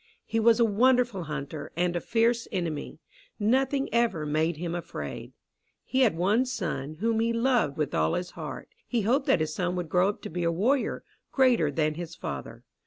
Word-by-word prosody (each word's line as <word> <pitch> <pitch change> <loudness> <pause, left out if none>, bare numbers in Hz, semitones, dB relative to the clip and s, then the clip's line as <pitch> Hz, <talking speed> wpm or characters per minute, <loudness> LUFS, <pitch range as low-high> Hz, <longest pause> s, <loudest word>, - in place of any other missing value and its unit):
He 225 - -1
was 225 +1 +5
a 235 - +6
wonderful 240 -3 +2
hunter 150 0 -5
and 175 0 +1
a 175 - -1
fierce 230 0 +1
enemy. 170 -7 -3 0.4
Nothing 265 +5 +1
ever 235 -10 +1
made 155 +2 0
him 170 +1 -3
afraid. 175 -1 -6 0.5
He 260 - -1
had 225 -11 +3
one 210 +9 +2
son, 155 - -3
whom 225 0 +1
he 230 +1 +2
loved 230 - +1
with 150 -3 -1
all 80 0 +2
his 180 0 -3
heart. - - -7 0.2
He 240 -2 0
hoped 265 +7 +1
that 270 - +5
this 155 -1 -2
son 180 +1 -1
would 175 -3 -3
grow 180 +3 +3
up 205 - -6
to - - -5
be 175 +2 -3
a 170 - +2
warrior, 240 +11 0 0.3
greater 250 - +3
than 155 +1 0
his 170 +1 -7
father. 70 -2 -6
185 Hz, 190 wpm, -27 LUFS, 160-235 Hz, 0.5 s, a